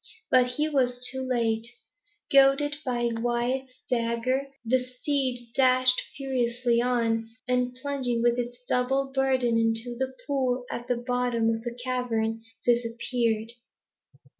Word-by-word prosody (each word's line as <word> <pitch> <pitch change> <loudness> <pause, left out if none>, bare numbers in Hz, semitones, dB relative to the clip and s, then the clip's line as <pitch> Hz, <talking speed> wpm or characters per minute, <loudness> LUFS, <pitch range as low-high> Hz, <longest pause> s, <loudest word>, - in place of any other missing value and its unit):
But 250 -1 +4
he 300 +4 0
was 250 -4 +1
too 265 0 -4
late. 230 -3 0 0.7
Goaded 275 +2 +5
by 240 -2 0
Wyat's 240 +3 -1
dagger, 245 +2 0 0.2
the 250 +2 +2
steed 250 -2 -1
dashed 255 0 +4 0.2
furiously 245 -3 0
on, 230 -2 0 0.2
and 250 0 0
plunging 260 -4 -1
with 240 0 +3
its 245 0 -4
double 270 +2 +1
burden 260 -4 +2
into 225 +2 0
the 260 +1 -3
pool 255 -3 0
at 240 - -5
the 245 - 0
bottom 245 -2 0
of 225 0 -2
the 240 0 -6
cavern, 225 -3 -1 0.2
disappeared. 235 -1 0
245 Hz, 125 wpm, -27 LUFS, 235-260 Hz, 0.7 s, Goaded